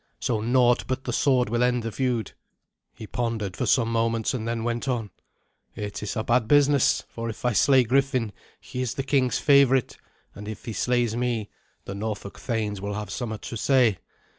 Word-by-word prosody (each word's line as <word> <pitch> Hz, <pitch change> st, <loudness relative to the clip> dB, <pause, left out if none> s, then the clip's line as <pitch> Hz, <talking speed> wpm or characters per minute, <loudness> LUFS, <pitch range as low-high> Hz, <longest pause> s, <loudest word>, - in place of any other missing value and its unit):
So 110 Hz, -3 st, -1 dB
naught 120 Hz, +1 st, +3 dB
but 130 Hz, 0 st, -2 dB
the 125 Hz, -, -3 dB
sword 130 Hz, -1 st, +2 dB
will 120 Hz, +1 st, 0 dB
end 125 Hz, -1 st, +2 dB
the 115 Hz, -, -3 dB
feud." 125 Hz, -2 st, -1 dB, 0.6 s
He 110 Hz, -, -10 dB
pondered 110 Hz, -4 st, -3 dB
for -, -, -2 dB
some 115 Hz, -3 st, +3 dB
moments, 115 Hz, -1 st, 0 dB
and 115 Hz, -3 st, -3 dB
then 115 Hz, -1 st, -2 dB
went 120 Hz, +2 st, -2 dB
on, 115 Hz, -6 st, -2 dB, 0.6 s
"It 105 Hz, -1 st, -5 dB
is 105 Hz, -, -4 dB
a 110 Hz, -, -1 dB
bad 120 Hz, 0 st, +2 dB
business; 145 Hz, 0 st, +4 dB
for 115 Hz, 0 st, -5 dB
if 110 Hz, -, -7 dB
I 120 Hz, -, +2 dB
slay 130 Hz, +6 st, +5 dB
Griffin, 130 Hz, -2 st, +1 dB, 0.3 s
he 125 Hz, 0 st, -6 dB
is 125 Hz, -2 st, -2 dB
the 135 Hz, -, -2 dB
king's 130 Hz, -2 st, +1 dB
favourite; 140 Hz, -3 st, +4 dB, 0.4 s
and 105 Hz, +1 st, -9 dB
if 110 Hz, -2 st, -7 dB
he 115 Hz, -, -4 dB
slays 120 Hz, -1 st, +1 dB
me, 120 Hz, -3 st, -2 dB, 0.3 s
the 95 Hz, -, -5 dB
Norfolk 100 Hz, -1 st, -5 dB
thanes 105 Hz, -5 st, -2 dB
will 100 Hz, 0 st, -3 dB
have 105 Hz, 0 st, -5 dB
somewhat 110 Hz, -4 st, -4 dB
to 115 Hz, -, -5 dB
say. 120 Hz, -5 st, +3 dB
120 Hz, 190 wpm, -25 LUFS, 110-125 Hz, 0.6 s, slay